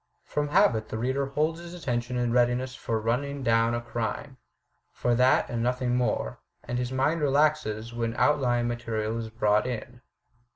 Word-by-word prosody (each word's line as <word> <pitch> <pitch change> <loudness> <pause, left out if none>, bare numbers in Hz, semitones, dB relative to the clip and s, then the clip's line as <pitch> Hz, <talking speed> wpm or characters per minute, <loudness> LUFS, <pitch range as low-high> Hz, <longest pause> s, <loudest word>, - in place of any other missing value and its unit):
From 150 0 -1
habit 110 -6 +3
the - - -4
reader 130 +4 0
holds 155 +4 0
his 175 +1 -9
attention 125 -6 -2
in 120 -1 0
readiness 125 +1 +2
for 115 -3 -2
running 135 +5 -1
down 115 0 +3
a 120 - -2
crime 120 +4 -4 0.3
— - - -47
for 120 - +2
that 125 +2 +4
and 120 -1 -3
nothing 125 0 0
more 60 - -1
— - - -27
^and 120 0 -2
his 125 0 -2
mind 145 +5 +1
relaxes 140 -6 +1
when 115 0 -2
outlying 125 -5 +2
material 115 -2 -2
is 110 -1 -5
brought 105 0 +2
in. 120 0 -6
120 Hz, 175 wpm, -27 LUFS, 115-135 Hz, 0.3 s, that